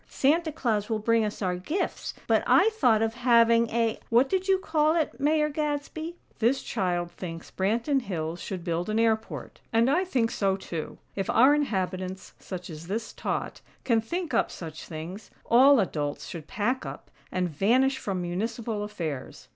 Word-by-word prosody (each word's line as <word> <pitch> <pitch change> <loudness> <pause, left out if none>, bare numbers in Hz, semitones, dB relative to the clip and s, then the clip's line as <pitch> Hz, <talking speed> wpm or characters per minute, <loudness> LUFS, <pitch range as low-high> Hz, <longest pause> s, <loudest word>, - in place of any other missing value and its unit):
Santa 315 +4 +2
Claus 225 -8 -1
will 220 - +1
bring 230 +1 +2
us 210 0 -3
our 180 -1 0
gifts! 310 - -3
But - - +3
I 430 +4 +5
thought 240 - +3
of 225 0 0
having 235 -1 +4
a 230 -1 0
what 245 +3 +4
did 380 0 0
you 385 -1 +4
call 315 -4 +2
it, 320 -4 -1
Mayor 300 +2 +3
Gadsby?" 300 +2 -3 0.2
"This 240 +4 +2
child 175 -5 -1
thinks 165 -3 -8
Branton 235 +8 +1
Hills 170 -6 -4
should 185 -4 -5
build 170 +2 -2
an 215 - 0
airport, 225 -1 -1
and 230 +3 +3
I 355 +6 +3
think 245 -11 0
so, 195 -2 +1
too. 165 -4 -6 0.2
If 195 -1 -2
our 260 +5 +6
inhabitants, 190 -9 -2
such 180 -2 -7
as 160 +1 -9
this 220 +4 -3
tot, - - -3 0.2
can 230 -3 +3
think 340 +9 -4
up - - +2
such 160 -2 -8
things, 170 +6 -7 0.2
all 265 +3 +6
adults 150 -7 -2
should 160 -3 -8
pack 240 +6 -1
up, - - -8 0.2
and 185 -1 0
vanish 250 - +2
from 190 -6 -3
municipal 215 +4 -3
affairs. 165 -10 -6
225 Hz, 170 wpm, -27 LUFS, 185-270 Hz, 0.2 s, our